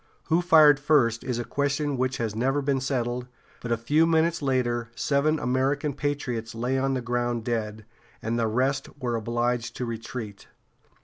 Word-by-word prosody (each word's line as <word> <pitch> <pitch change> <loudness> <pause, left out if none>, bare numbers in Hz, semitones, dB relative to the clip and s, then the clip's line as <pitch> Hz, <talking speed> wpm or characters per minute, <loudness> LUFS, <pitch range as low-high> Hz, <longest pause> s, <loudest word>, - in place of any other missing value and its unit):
Who 165 +2 +3
fired 155 -5 +6
first 135 -6 +2
is 125 -2 -2
a 120 - -2
question 140 +3 -1
which 130 +1 -1
has 110 -3 -2
never 135 +5 0
been 135 -1 0
settled, 125 -2 -2 0.3
but 120 - -5
a 115 - +2
few 150 +8 +2
minutes 165 0 +2
later 120 -4 0
seven 150 +5 +1
American 135 +3 0
patriots 130 -6 -3
lay 125 +3 -1
on 135 0 0
the 130 - -2
ground 120 -1 -1
dead, 110 -2 -3 0.3
and 115 +1 -2
the 115 - +1
rest 130 +4 0
were 120 -3 -1
obliged 120 +1 -1
to 125 - -3
retreat. 115 -2 -6
125 Hz, 170 wpm, -26 LUFS, 115-140 Hz, 0.3 s, fired